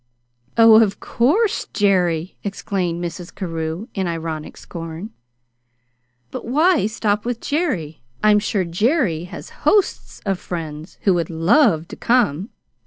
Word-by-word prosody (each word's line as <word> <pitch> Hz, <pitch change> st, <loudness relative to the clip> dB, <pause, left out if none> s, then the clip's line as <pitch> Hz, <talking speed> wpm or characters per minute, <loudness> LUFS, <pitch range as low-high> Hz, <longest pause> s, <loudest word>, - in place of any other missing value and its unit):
"Oh, 225 Hz, -1 st, +8 dB
of 200 Hz, -3 st, +1 dB
course, 380 Hz, -, +1 dB
JERRY!" 180 Hz, -4 st, +1 dB
exclaimed 180 Hz, -3 st, -2 dB
Mrs. 175 Hz, +1 st, -7 dB
Carew 165 Hz, +1 st, -4 dB
in 190 Hz, -3 st, -1 dB
ironic 160 Hz, -2 st, -4 dB
scorn. 165 Hz, +5 st, -7 dB, 1.2 s
"But -, -, -6 dB
why 305 Hz, -, +3 dB
stop 210 Hz, -1 st, 0 dB
with 240 Hz, -1 st, -3 dB
Jerry? 185 Hz, -, -2 dB, 0.2 s
I'm 210 Hz, -1 st, +6 dB
sure 205 Hz, -1 st, 0 dB
Jerry 180 Hz, -, +1 dB
has 180 Hz, -, -9 dB
hosts 410 Hz, -3 st, +1 dB
of 195 Hz, -2 st, 0 dB
friends 160 Hz, -2 st, -6 dB
who 195 Hz, -, +4 dB
would 170 Hz, -2 st, -1 dB
love 165 Hz, -, +3 dB
to -, -, -7 dB
come. 215 Hz, -, +1 dB
190 Hz, 125 wpm, -21 LUFS, 165-225 Hz, 1.2 s, Oh